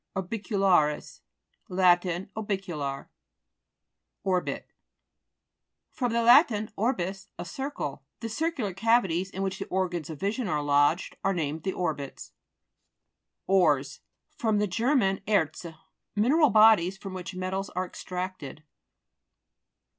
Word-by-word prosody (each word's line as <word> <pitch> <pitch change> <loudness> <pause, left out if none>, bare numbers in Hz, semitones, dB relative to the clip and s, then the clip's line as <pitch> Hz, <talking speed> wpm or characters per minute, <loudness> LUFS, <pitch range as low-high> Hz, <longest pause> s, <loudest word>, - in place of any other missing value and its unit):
ORBICULA'RIS 190 -5 0 0.5
Lat. 180 -1 +4 0.3
Orbicular. 180 -10 -3 1.2
ORBIT 185 -2 -1 1.2
fr. 255 -5 -1
lat. 235 -1 +4
orbis, 195 -4 -2
a - - -5
circle. 175 - -5 0.2
The 230 - -4
circular 265 - -2
cavities 195 -4 +2
in 195 0 -4
which 190 0 -3
the - - -5
or 185 0 0
gans 170 -4 -5
of 155 -3 -7
vision 210 +4 -1
are 150 -5 -1
lodged, 145 +4 +2
are 195 -1 +1
named 155 -1 -2
the 190 +3 -2
orbits. 150 -6 -4 1.1
ORES 155 -8 +2 0.4
fr. 230 -7 0
ger. 230 +9 +1
erzc. 195 - 0 0.4
Mineral 280 +9 +4
bodies 215 -5 +5
from 195 -1 -8
which 185 0 -6
metals 190 +1 -3
are 185 +1 -2
extracted. 180 -6 -6
190 Hz, 110 wpm, -27 LUFS, 175-220 Hz, 1.2 s, bodies